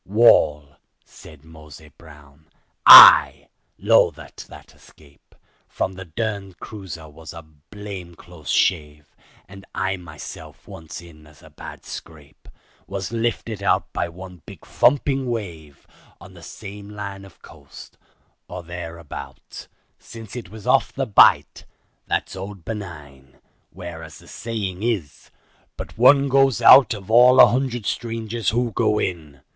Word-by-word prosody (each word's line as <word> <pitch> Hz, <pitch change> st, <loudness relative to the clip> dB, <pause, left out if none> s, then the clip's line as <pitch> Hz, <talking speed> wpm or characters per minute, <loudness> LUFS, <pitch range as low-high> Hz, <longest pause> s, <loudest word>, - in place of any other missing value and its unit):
"Wall," 75 Hz, -9 st, +2 dB, 0.3 s
said 80 Hz, 0 st, -17 dB
Mose 75 Hz, -1 st, -15 dB, 0.2 s
Brown, 75 Hz, -1 st, -19 dB, 0.4 s
"I -, -, +9 dB, 0.3 s
'low -, -, +3 dB
that -, -, -14 dB
that -, -, -15 dB
escape 70 Hz, -2 st, -23 dB, 0.3 s
From 95 Hz, -, -4 dB
the 95 Hz, 0 st, -10 dB
derned 100 Hz, +1 st, -6 dB
cruiser 95 Hz, -7 st, -10 dB
was 80 Hz, +1 st, -13 dB
a 85 Hz, -1 st, -11 dB
blame 85 Hz, +4 st, -12 dB
close 85 Hz, -6 st, -14 dB
shave, 75 Hz, -4 st, -2 dB, 0.3 s
And 95 Hz, 0 st, -14 dB
I 95 Hz, 0 st, -2 dB
myself 85 Hz, -4 st, -12 dB
once 80 Hz, 0 st, -11 dB
in 80 Hz, -3 st, -17 dB
as 75 Hz, -2 st, -21 dB
bad -, -, -11 dB
a -, -, -24 dB
scrape 75 Hz, -3 st, -13 dB, 0.4 s
Was 100 Hz, +1 st, -6 dB
lifted 115 Hz, -2 st, -4 dB
out 100 Hz, -, -1 dB
by 85 Hz, -, -3 dB
one 90 Hz, 0 st, -13 dB
big -, -, -14 dB
thumping 135 Hz, -2 st, 0 dB
wave 85 Hz, -, -8 dB, 0.3 s
On -, -, -15 dB
the -, -, -16 dB
same 100 Hz, 0 st, -11 dB
line 100 Hz, -2 st, -8 dB
of 95 Hz, -, -19 dB
coast—or 90 Hz, -, -15 dB
thereabout, 85 Hz, -5 st, -10 dB, 0.3 s
Since 115 Hz, -2 st, -13 dB
it 115 Hz, -8 st, -8 dB
was 110 Hz, +1 st, -13 dB
off 130 Hz, +2 st, +1 dB
the 135 Hz, -, -4 dB
Bight—that's 105 Hz, -3 st, 0 dB
old 95 Hz, -2 st, -10 dB
Benin— 75 Hz, -, -10 dB, 0.3 s
Where 85 Hz, -2 st, -10 dB
as 80 Hz, -2 st, -12 dB
the -, -, -19 dB
sayin' 105 Hz, -5 st, -6 dB
is, 105 Hz, -, -4 dB, 0.5 s
'but -, -, -9 dB
one 135 Hz, +5 st, +4 dB
goes 135 Hz, -2 st, +2 dB
out 120 Hz, 0 st, +6 dB
Of 100 Hz, +1 st, -10 dB
all 125 Hz, +2 st, +5 dB
a -, -, +10 dB
hundred 120 Hz, -3 st, -3 dB
strangers 115 Hz, -3 st, -4 dB
who 120 Hz, +2 st, -2 dB
go 110 Hz, -2 st, 0 dB
in. 80 Hz, -9 st, -5 dB
95 Hz, 135 wpm, -21 LUFS, 80-110 Hz, 0.5 s, a